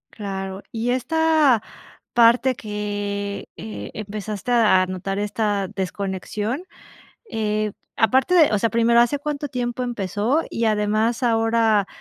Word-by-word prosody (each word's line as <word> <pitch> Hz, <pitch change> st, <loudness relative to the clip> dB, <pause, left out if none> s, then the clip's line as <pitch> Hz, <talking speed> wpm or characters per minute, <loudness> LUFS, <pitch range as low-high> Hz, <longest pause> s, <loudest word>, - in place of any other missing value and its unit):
Claro, 195 Hz, -2 st, -5 dB
y 230 Hz, +2 st, -1 dB
esta 305 Hz, -2 st, +3 dB, 0.5 s
parte 240 Hz, +2 st, +5 dB
que, 205 Hz, -2 st, -4 dB
eh, 220 Hz, 0 st, -7 dB
empezaste 210 Hz, +1 st, -5 dB
a 215 Hz, -6 st, +4 dB
notar 185 Hz, +1 st, -4 dB
esta 205 Hz, -1 st, -1 dB
desconexión, 205 Hz, -, -3 dB, 0.7 s
eh, 215 Hz, -1 st, -1 dB, 0.2 s
aparte 260 Hz, -, +3 dB
de 325 Hz, -4 st, +6 dB
O -, -, +2 dB
sea, 230 Hz, +3 st, +1 dB
primero, 235 Hz, 0 st, +4 dB
¿hace 240 Hz, +4 st, +2 dB
cuánto 290 Hz, 0 st, -3 dB
tiempo 250 Hz, -2 st, -3 dB
empezó? 230 Hz, -, 0 dB
Y 230 Hz, -, -2 dB
además, 215 Hz, +2 st, +1 dB
ahora 225 Hz, -3 st, +2 dB
220 Hz, 120 wpm, -22 LUFS, 205-240 Hz, 0.7 s, de